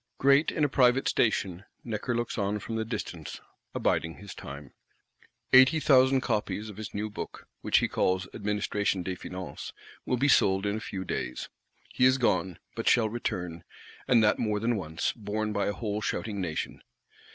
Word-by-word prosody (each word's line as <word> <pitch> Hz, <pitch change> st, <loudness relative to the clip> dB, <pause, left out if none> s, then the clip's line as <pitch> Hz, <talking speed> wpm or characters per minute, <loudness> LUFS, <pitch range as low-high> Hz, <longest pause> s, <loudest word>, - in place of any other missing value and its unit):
Great 140 Hz, +3 st, +4 dB
in 155 Hz, -, -1 dB
a -, -, +5 dB
private 130 Hz, -1 st, +3 dB
station, 100 Hz, -5 st, +1 dB, 0.2 s
Necker 115 Hz, +1 st, -2 dB
looks 120 Hz, 0 st, -2 dB
on 100 Hz, 0 st, 0 dB
from 115 Hz, +2 st, -5 dB
the 110 Hz, -, 0 dB
distance; 105 Hz, -, -5 dB, 0.4 s
abiding 80 Hz, 0 st, 0 dB
his 100 Hz, -3 st, -10 dB
time. 70 Hz, -1 st, -9 dB, 0.8 s
"Eighty 130 Hz, +5 st, +7 dB
thousand 130 Hz, -2 st, +5 dB
copies" 105 Hz, -2 st, -2 dB
of 100 Hz, -, -14 dB
his 110 Hz, -3 st, -6 dB
new 105 Hz, +1 st, -3 dB
Book, 105 Hz, -, -8 dB
which -, -, +3 dB
he -, -, +3 dB
calls 95 Hz, 0 st, 0 dB
Administration 105 Hz, -2 st, -1 dB
des 95 Hz, +1 st, -3 dB
Finances, 90 Hz, 0 st, -7 dB, 0.3 s
will 125 Hz, -, 0 dB
be 135 Hz, +4 st, +2 dB
sold 95 Hz, -7 st, +4 dB
in 105 Hz, +1 st, 0 dB
few 95 Hz, -3 st, -5 dB
days. 65 Hz, -7 st, -4 dB, 0.4 s
He 125 Hz, -, +3 dB
is 130 Hz, +1 st, +5 dB
gone; 95 Hz, -8 st, +1 dB, 0.2 s
but -, -, 0 dB
shall 110 Hz, -2 st, +4 dB
return, 90 Hz, -7 st, -4 dB, 0.4 s
and 115 Hz, -3 st, +5 dB
that 105 Hz, -, +3 dB
more 105 Hz, -2 st, 0 dB
than 115 Hz, +2 st, +1 dB
once, 80 Hz, -5 st, -2 dB
borne 105 Hz, -1 st, -3 dB
by 100 Hz, -, 0 dB
a -, -, +1 dB
whole 105 Hz, 0 st, -3 dB
shouting 105 Hz, -2 st, -2 dB
Nation. 80 Hz, -4 st, -4 dB
105 Hz, 175 wpm, -28 LUFS, 95-120 Hz, 0.8 s, Eighty